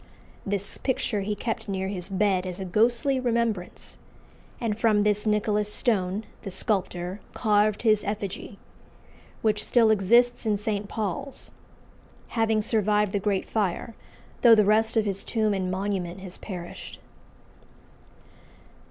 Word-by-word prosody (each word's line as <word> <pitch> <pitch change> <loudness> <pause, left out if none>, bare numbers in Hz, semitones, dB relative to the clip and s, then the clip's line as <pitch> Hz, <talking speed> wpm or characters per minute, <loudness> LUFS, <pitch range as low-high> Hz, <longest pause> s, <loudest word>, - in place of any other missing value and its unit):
This 200 0 0
picture 240 -5 0
he 210 +2 -2
kept 225 -1 -4
near 190 -1 -2
his 190 -1 -5
bed 190 -2 +1
as 180 0 -6
a 190 - -4
ghostly 240 +8 +2
remembrance, 235 -6 -2 0.6
and 225 -3 -1
from 215 -2 +3
this 210 +1 +1
Nicholas 210 0 +1
Stone, 205 -3 0 0.2
the 200 - -6
sculptor, 185 -2 -2
carved 210 -1 +2
his 215 -2 +4
effigy, 200 -1 -5 0.9
which 210 -1 +1
still 230 -3 +4
exists 235 +4 +3
in 215 -3 +1
St. 205 -1 -3
Paul's, 245 +6 -4 0.8
having 225 -2 +1
survived 210 -2 +2
the 200 - 0
Great 195 -1 -1
Fire, 215 +2 -1 0.5
though 235 -2 +8
the 210 -2 +4
rest 220 +2 +3
of 220 - +3
his 195 -1 -1
tomb 215 -3 0
and 185 -2 -1
monument 185 -1 -2
has 185 -1 -8
perished. 180 -4 -7
210 Hz, 135 wpm, -26 LUFS, 195-220 Hz, 0.9 s, though